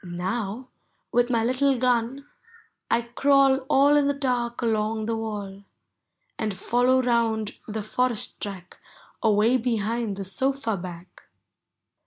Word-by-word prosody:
Now, 195 +7 -4 0.4
with 245 +1 +2
niy 230 -2 +1
little 260 +2 +2
gun. 250 +2 0 0.6
I 235 - +2
crawl 270 +2 +3
All 285 +2 +5
in 290 -1 +3
the 285 - +1
dark 245 -3 -1
along 220 -1 0
the 230 +1 -1
wall. 205 -3 -5 0.8
And 215 -3 -2
follow 250 +6 +2
round 225 -3 +1
the 215 -1 -4
forest 245 +1 -2
track 190 -3 -7 0.4
Away 220 +3 +3
behind 225 -3 -1
the 195 - -5
sofa 260 +3 -1
back. 175 -1 -10
230 Hz, 125 wpm, -25 LUFS, 210-255 Hz, 0.8 s, All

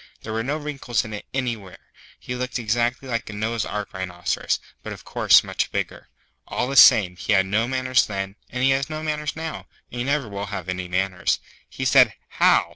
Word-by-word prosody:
There 110 - -6
were 110 - 0
no 140 +6 -1
wrinkles 140 -6 -2
in 110 - -7
it 105 - -7
anywhere. 115 -8 -3 0.4
He 125 - -6
looked 125 +1 -3
exactly 120 +3 0
like 115 -3 -3
a - - -6
Noah's 110 +1 -2
Ark 105 -1 -4
Rhinoceros, 90 -2 -2 0.2
but - - -6
of - - -12
course - - +5
much - - -2
bigger. - - -4 0.4
All 125 - -1
the 135 - -3
same, 105 -10 +8
he 105 - 0
had 95 -1 +4
no 110 +4 +1
manners 130 0 +2
then, 95 -1 -4
and 125 +1 -3
he 135 - +5
has 135 +1 0
no 155 0 -4
manners 150 -1 -2
now, 160 0 -6 0.2
and 120 - -6
he - - 0
never 140 -1 0
will 100 0 -5
have 95 -3 -5
any 90 0 -3
manners. 90 +1 0 0.3
He 130 - -5
said, 125 -5 +5
'How! - - +4
115 Hz, 205 wpm, -23 LUFS, 100-130 Hz, 0.4 s, same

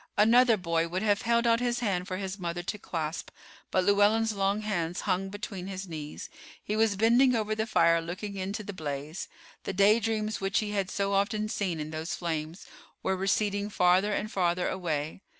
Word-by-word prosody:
Another 230 +2 +6
boy 170 -3 0
would 185 +4 -3
have 205 -1 +2
held 235 0 +2
out 230 0 +4
his 245 -1 0
hand 190 -6 -1
for 185 -2 -3
his 195 +1 -5
mother 175 0 -3
to 205 +3 -4
clasp, 160 -3 -4 0.4
but 185 - +2
Llewellyn's 210 +3 +3
long 200 +1 0
hands 175 -5 -2
hung 195 -1 -1
between 200 -2 -6
his 195 0 -5
knees. 155 -3 -7 0.4
He 210 - -2
was 220 -2 +2
bending 240 +5 +4
over 215 -1 0
the 220 +1 -1
fire, 170 -4 +4
looking 185 +5 -6
into 195 +3 -4
the 205 - -6
blaze. 150 0 -5 0.4
The - - -3
daydreams 215 +2 +2
which 195 0 0
he 210 -1 0
had 195 -2 -1
so 200 -1 -1
often 210 +2 +1
seen 185 -7 -2
in 150 0 -5
those 160 +2 -3
flames 160 -1 -4 0.4
were 190 - +1
receding 200 +2 0
farther 185 +1 +3
and 210 +1 -2
farther 180 -1 +1
away. 160 -2 -3
195 Hz, 185 wpm, -29 LUFS, 175-215 Hz, 0.4 s, Another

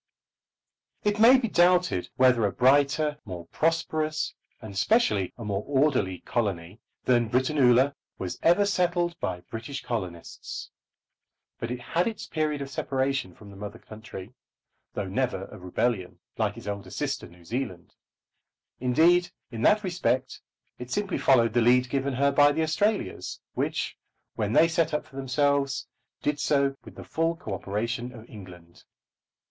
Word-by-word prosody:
It 210 0 +1
may 240 +4 +8
be 250 -2 -1
doubted 180 - +3
whether 125 -3 +4
a - - -2
brighter, 145 +4 +3
more 90 -4 -7
prosperous, 155 - -1 0.3
and 110 -3 -9
specially 105 - +2
a 115 - -7
more 100 0 -2
orderly 130 - +1
colony 100 -4 -2 0.2
than 120 -3 +2
Britannula 130 +1 +4 0.2
was 90 -2 -5
ever 175 +5 +4
settled 175 -3 +1
by 90 -1 -3
British 115 +8 -7
colonists. 90 -8 -5 0.9
But 115 - -4
it 125 0 -3
had 175 - 0
its 225 -2 -4
period 150 -3 -1
of 135 - -9
separation 135 -7 -1
from 105 -2 -13
the - - -12
mother 105 +1 -7
country, 110 -1 -10 0.6
though - - -2
never - - -1
of - - -11
rebellion, 90 +1 -1 0.2
like - - -1
its - - -10
elder 100 -1 -5
sister - - -3
New 85 0 -18
Zealand. 95 -5 -4 0.9
Indeed, 165 +8 +4 0.2
in 115 -2 -5
that 210 - +4
respect 170 -8 -1 0.4
it 125 0 -7
simply 200 +4 -1
followed 115 -4 +4
the 120 - +3
lead 125 +2 +4
given 135 -1 0
her 140 +2 +3
by 145 +1 +6
the 160 +2 0
Australias, 205 +7 -1
which, - - -2 0.4
when 105 0 -2
they 165 - +6
set 165 -2 +1
up - - -2
for 135 - -18
themselves, 140 +1 +1 0.4
did 145 0 0
so 140 -2 +2
with - - -13
the - - -9
full 165 +1 0
co 110 -11 -6
operation 115 +6 -3
of 115 -1 -12
England. 90 -5 -13
130 Hz, 150 wpm, -27 LUFS, 110-155 Hz, 0.9 s, may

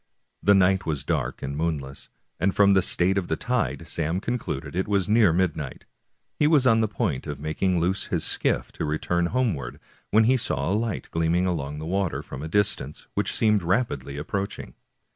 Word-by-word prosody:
The 100 - +5
night 95 0 +3
was 75 -4 -1
dark - - -2
and 70 +1 -3
moonless, 75 -4 -3 0.3
and 95 +3 +1
from 100 -1 +5
the 95 - +5
state 95 +2 +2
of 90 - -5
the 80 - 0
tide 115 -6 -2
Sam 80 +2 -1
concluded 80 - -4
it 95 - 0
was 100 -3 +1
near 105 -3 +5
midnight. 80 -5 -2 0.5
He 150 - +4
was 150 -4 +4
on 115 -3 +5
the 110 - +2
point 100 - -2
of 75 -1 -5
making 85 +4 0
loose 90 +4 0
his - - -1
skiff - - 0
to - - -4
return 85 +3 0
homeward 95 - -1 0.3
when 110 +1 +5
he 130 +4 +4
saw 70 - -1
a - - +2
light 110 0 -2
gleaming 85 +2 +1
along 75 -5 -2
the 80 - -6
water 95 0 -1
from 65 - -8
a 80 - -4
distance, 80 -5 0
which - - -1
seemed 105 -2 +3
rapidly 90 - -1
ap 75 - -6
proaching. 100 - -4
90 Hz, 195 wpm, -25 LUFS, 75-105 Hz, 0.5 s, The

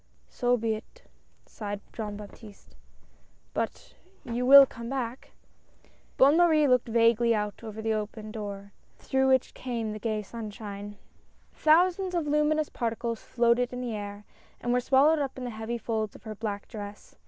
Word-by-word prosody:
"So 245 0 +1
be 225 -1 0
it," 225 - -10 0.4
sighed 205 -2 -6
Jean 210 -2 -5
Baptiste. 210 0 -13 0.8
"But - - -4 0.2
— - - -33
you 245 +1 -2
will 275 +1 +11
come 235 -2 -8
back? 255 -1 -4 0.4
" - - -33
Bonne 280 +4 +6
Marie 320 -4 +5
looked 250 -2 +3
vaguely 230 0 +3
out 210 -1 -1
through 220 0 -9
the 220 0 +1
open 215 0 -4
door, 200 -2 -7 0.3
through 265 0 +1
which 260 -1 +2
came 230 -4 -4
the 215 - -6
gay 215 -1 -2
sunshine. 205 -2 -8 0.6
Thousands 360 +4 +3
of 335 -3 0
luminous 300 +1 +1
particles 230 -1 -3
floated 240 0 +1
in 250 - -4
the 240 -3 -3
air 205 0 -7 0.3
and 240 0 -1
were 250 - +3
swallowed 280 +5 +4
up 275 -2 -3
in 255 - -6
the 245 - -4
heavy 220 +2 -4
folds 220 -2 -3
of - - -14
her 220 -1 -6
black 205 -1 -5
dress. 205 -2 -9
230 Hz, 165 wpm, -28 LUFS, 215-265 Hz, 0.8 s, will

